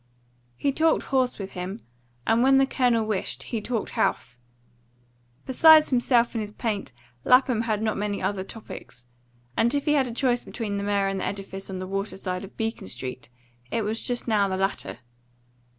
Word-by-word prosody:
He 280 - +1
talked 320 +4 +2
horse 260 -2 +1
with 195 -2 -6
him, 185 +4 -5 0.5
and 225 +1 +3
when 270 +1 +5
the 270 - +5
Colonel 245 -4 +1
wished 215 -3 -2
he 230 -3 -4
talked 230 -1 -3
house. 120 0 -1 1.1
Besides 310 +4 +7
himself 240 -1 +3
and 225 - -1
his 210 - -4
paint 210 - -3 0.3
Lapham 250 -2 +4
had 215 0 0
not 215 -1 0
many 205 0 -2
other 190 0 -1
topics; 190 - -10 0.5
and 235 +4 +2
if 285 - -1
he 300 - +3
had 275 -3 +3
a - - -5
choice 245 0 +1
between 210 -4 -4
the 200 - -3
mare 200 -1 +1
and 195 0 -2
the - - -2
edifice 195 -1 -4
on 190 - -4
the 185 - -4
water 195 +2 -3
side 185 -1 -4
of 195 - -12
Beacon 225 - -3
Street, 125 +4 -7 0.4
it 230 - -1
was 215 +2 -1
just 245 0 -1
now 210 -3 +3
the 190 -1 -2
latter. 190 - -2
215 Hz, 185 wpm, -25 LUFS, 195-245 Hz, 1.1 s, Besides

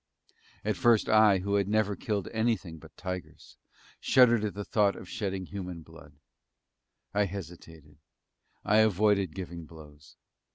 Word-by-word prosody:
At 105 -3 -1
first 115 +2 +3
I, 110 -2 +5
who 100 +2 -3
had 100 -1 0
never 105 -1 +1
killed 105 -2 -3
anything 110 -8 -2
but 80 0 -17
tigers, 90 -1 -7 0.4
shuddered 120 -4 +4
at 105 -2 -3
the 105 0 -5
thought 105 -2 +2
of - - -10
shedding 95 -5 -4
human 90 -4 -7
blood. 80 -2 -15 1.0
I 105 0 +2
hesitated 80 -5 -10 0.7
I 105 - +3
avoided 105 -4 +2
giving 85 -3 -7
blows. 75 -2 -15
100 Hz, 135 wpm, -29 LUFS, 85-105 Hz, 1.0 s, I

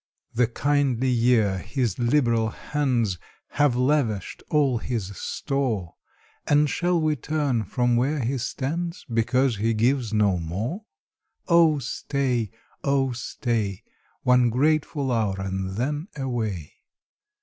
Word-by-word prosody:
The 120 0 +3
kindly 130 0 +1
year, 115 -5 +3
his 120 +4 -2
liberal 120 -3 +2
hands 120 - -1 0.3
Have 145 -4 +2
lavished 125 -6 0
all 140 -6 +2
his 105 -5 -4
store. 120 - -2 0.5
And 150 +1 +4
shall 175 +3 +1
we 155 -1 +1
turn 140 -5 -1
from 120 +4 +1
where 140 +6 +1
he 130 +2 -1
stands, 165 +8 -3
Because 125 +1 +2
he 115 +2 +1
gives 120 +1 +1
no 105 -4 +2
more? 110 - -4 0.6
Oh 165 -3 +5
stay, 125 -3 -1 0.3
oh 135 -2 +2
stay, 115 -4 -2 0.4
One 125 -1 +4
grateful 145 +1 +1
hour, 110 -5 +1
and 95 0 -3
then 145 +7 -2
away. 110 - -3
125 Hz, 115 wpm, -25 LUFS, 110-145 Hz, 0.6 s, Oh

